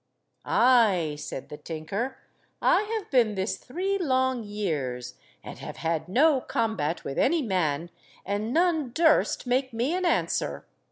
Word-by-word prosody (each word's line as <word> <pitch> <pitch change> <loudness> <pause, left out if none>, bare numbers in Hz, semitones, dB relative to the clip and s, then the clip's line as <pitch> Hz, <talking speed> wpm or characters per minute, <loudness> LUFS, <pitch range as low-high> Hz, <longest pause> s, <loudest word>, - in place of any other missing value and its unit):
"Ay!" 210 -11 +4
said 135 - -6
the 150 - -7
tinker, 195 - -4 0.4
"I - - +4 0.2
have 410 - -8
been 235 -6 +3
this 190 +2 -2
three 380 +8 -2
long 260 -6 +1
years, 155 - -3 0.3
and - - -9
have - - -8
had 160 -1 -2
no 275 +6 +4
combat 220 -11 -1
with 135 - -4
any 315 +2 +3
man, 170 - -1 0.3
and 205 +3 -2
none 320 -5 +1
durst 320 -2 +3
make 255 +1 0
me 240 +8 0
an 370 +1 -1
answer. 345 - 0
230 Hz, 145 wpm, -27 LUFS, 170-270 Hz, 0.4 s, Ay